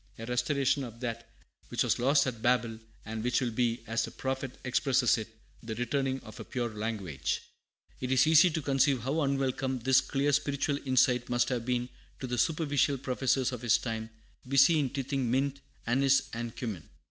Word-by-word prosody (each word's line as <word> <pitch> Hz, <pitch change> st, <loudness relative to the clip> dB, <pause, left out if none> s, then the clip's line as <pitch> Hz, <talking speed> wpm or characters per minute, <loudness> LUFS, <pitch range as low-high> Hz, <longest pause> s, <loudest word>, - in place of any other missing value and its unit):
a 115 Hz, -, -7 dB
restoration 135 Hz, +3 st, +1 dB
of 115 Hz, -2 st, -9 dB
that 115 Hz, -2 st, -5 dB, 0.4 s
which -, -, 0 dB
was -, -, +1 dB
lost 140 Hz, +3 st, +4 dB
at 120 Hz, -4 st, -4 dB
Babel, 120 Hz, -2 st, +1 dB, 0.3 s
and 110 Hz, 0 st, -5 dB
which 125 Hz, 0 st, +2 dB
will 125 Hz, -3 st, -1 dB
be, 115 Hz, 0 st, 0 dB
as 115 Hz, 0 st, -1 dB
the -, -, -4 dB
prophet 130 Hz, -1 st, -4 dB
expresses 125 Hz, -1 st, +2 dB
it, 110 Hz, -, -5 dB, 0.3 s
'the 110 Hz, -1 st, -5 dB
returning 130 Hz, +3 st, -1 dB
of 110 Hz, -2 st, -12 dB
a -, -, -5 dB
pure 120 Hz, -4 st, -3 dB
language!'" 105 Hz, -9 st, -3 dB, 0.6 s
It 130 Hz, 0 st, -3 dB
is 130 Hz, +2 st, +5 dB
easy 160 Hz, +3 st, +6 dB
to 160 Hz, -2 st, -3 dB
conceive 135 Hz, -2 st, +2 dB
how 140 Hz, +7 st, -1 dB
unwelcome 135 Hz, -1 st, 0 dB
this 130 Hz, +2 st, +4 dB
clear 140 Hz, +1 st, 0 dB
spiritual 140 Hz, 0 st, 0 dB
insight 125 Hz, -1 st, +3 dB
must 120 Hz, 0 st, +1 dB
have 120 Hz, -2 st, -2 dB
been 125 Hz, -1 st, 0 dB, 0.3 s
to -, -, -4 dB
the 125 Hz, -1 st, -2 dB
superficial 145 Hz, -4 st, +1 dB
professors 130 Hz, 0 st, 0 dB
of 125 Hz, -2 st, -6 dB
his 120 Hz, -1 st, +4 dB
time 110 Hz, -1 st, -4 dB, 0.4 s
busy 140 Hz, +4 st, +5 dB
in 140 Hz, -3 st, 0 dB
tithing 135 Hz, -1 st, -2 dB
mint, 135 Hz, +2 st, 0 dB, 0.2 s
anise, 135 Hz, +2 st, +3 dB
and 115 Hz, 0 st, -5 dB
cummin. 105 Hz, -10 st, -6 dB
125 Hz, 180 wpm, -30 LUFS, 120-135 Hz, 0.6 s, easy